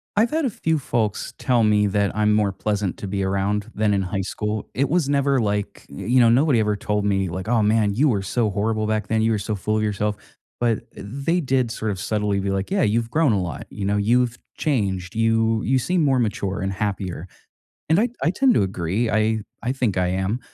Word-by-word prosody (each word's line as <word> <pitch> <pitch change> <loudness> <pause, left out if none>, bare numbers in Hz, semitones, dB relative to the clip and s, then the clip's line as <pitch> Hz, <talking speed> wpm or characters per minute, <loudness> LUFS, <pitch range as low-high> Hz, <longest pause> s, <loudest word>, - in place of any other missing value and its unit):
I've 220 +3 +3
had 315 -1 0
a - - +1
few 160 -5 0
folks 115 -7 -2
tell 125 -3 +2
me 105 -1 +3
that 100 0 0
I'm 105 0 +3
more 105 -2 +2
pleasant 100 -1 -2
to 100 - -6
be 100 0 -2
around, 100 +3 -1
than 105 -1 +1
in 95 - 0
high 95 +1 -2
school. 105 +2 -4
It 135 +1 +1
was 155 -3 +1
never 140 -1 +2
like, 105 -2 -2
y 70 - -8
you 125 +3 +3
know, 115 -1 +6
nobody 130 0 +4
ever 105 -1 +1
told 105 +1 -1
me, 95 -3 +1
like, 95 +4 -5
"Oh, 115 -2 +2
man, 105 -1 +2
you 145 +4 +3
were 100 -5 +1
so 105 +2 0
horrible 110 +2 -1
back 110 0 -1
then, 110 0 +1
you 115 - +2
were 110 - +1
so 105 +2 -3
full 105 +3 -1
of 110 - 0
yourself." 105 0 -1 0.4
But 115 -2 +1
they 140 - -2
did 130 -4 0
sort 110 -2 -3
of 95 - -5
subtly 105 -1 -1
be 100 0 -1
like, 95 0 -2
"Yeah, 195 0 +1
you've 115 +2 +1
grown 155 -2 +2
a 95 - +1
lot," 85 -4 -5
you 100 - -5
know, 105 +1 +1
"You've 120 +3 +2 0.2
changed, 95 - -1
you 115 0 +2
you 130 0 +2
seem 175 +5 +1
more 135 -3 +3
mature, 100 -4 -1
and 95 0 -1
happier." 95 -3 -3 0.6
And 160 +5 +4
I 235 +2 +2
I 165 - +3
tend 260 +1 +3
to - - +3
agree, 95 +4 -1
I 110 0 +1 0.2
I 120 +2 -1
think 125 -8 -1
I 90 -1 +2
am. 95 +5 -1
110 Hz, 230 wpm, -22 LUFS, 100-125 Hz, 0.6 s, know